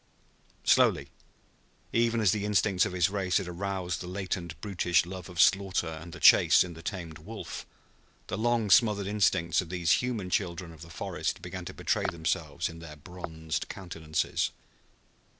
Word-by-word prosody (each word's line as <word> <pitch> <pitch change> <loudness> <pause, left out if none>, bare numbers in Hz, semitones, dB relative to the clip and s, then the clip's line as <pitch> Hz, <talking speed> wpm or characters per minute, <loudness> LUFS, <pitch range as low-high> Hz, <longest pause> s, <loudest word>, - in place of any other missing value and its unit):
Slowly, - - +3 0.8
even 115 0 +2
as 100 -4 +4
the 105 -1 -1
instincts 105 -2 +2
of - - -6
his 90 0 +2
race 95 -3 +1
had 95 - -2
aroused 90 0 -3
the 90 - -6
latent, 90 -4 -4
brutish 90 -3 +1
love 90 0 -8
of 90 -2 -8
slaughter 95 -2 +3
and 80 +2 -8
the 85 - -9
chase - - +7
in 90 -1 -7
the 80 - -11
tamed 85 -4 -6
wolf, 105 +8 -8 0.6
the - - -4
long 115 -1 +1
smothered 105 -3 +5
instincts 95 -5 +2
of 90 - -9
these 90 -2 +2
human 115 -7 -3
children 85 -3 -1
of 80 -2 -14
the 85 - -10
forest 75 - -4
began - - -6
to - - -7
betray - - 0
themselves 80 -1 -2
in 80 0 -9
their 80 -2 -10
bronzed 80 -1 -5
countenances. 80 -5 -2
90 Hz, 165 wpm, -29 LUFS, 85-100 Hz, 0.8 s, chase